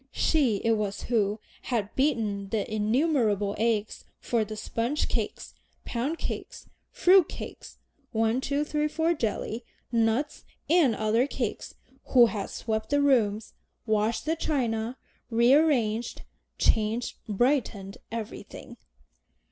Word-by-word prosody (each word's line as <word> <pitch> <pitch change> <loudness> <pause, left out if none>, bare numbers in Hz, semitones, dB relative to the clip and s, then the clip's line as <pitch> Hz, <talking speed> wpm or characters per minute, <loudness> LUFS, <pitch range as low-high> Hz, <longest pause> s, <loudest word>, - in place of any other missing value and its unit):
She 275 -9 +2
it 230 - +3
was 210 -2 -1
who 215 -3 +1 0.2
had 220 -5 -2
beaten 220 -8 0
the 215 -1 -1
innumerable 215 - +1
eggs 220 -2 0 0.2
for 235 -2 0
the 215 0 -7
sponge 235 +7 -1
cakes, - - -3 0.3
pound 265 +8 -2
cakes, - - -6 0.2
fruit 380 -8 +5
cakes, - - -9 0.3
"one, 225 +2 +1
two, 285 +2 0
three, 300 0 0
four," 325 +2 +1
jelly, 230 -3 -3 0.3
nut 230 +5 +1 0.3
and 305 -7 +4
other 220 +5 +2
cakes, 245 -6 -4 0.4
who 245 -2 +9
had 210 -2 -3
swept 220 -1 -3
the 285 - +2
rooms, 225 -7 +2 0.3
washed 220 +2 0
the 320 +1 +1
china, 245 -6 -1 0.3
rearranged, 240 -2 +3 0.3
changed, 220 +2 +1
brightened 210 -4 0
everything. 225 -1 -7
230 Hz, 115 wpm, -27 LUFS, 215-280 Hz, 0.4 s, who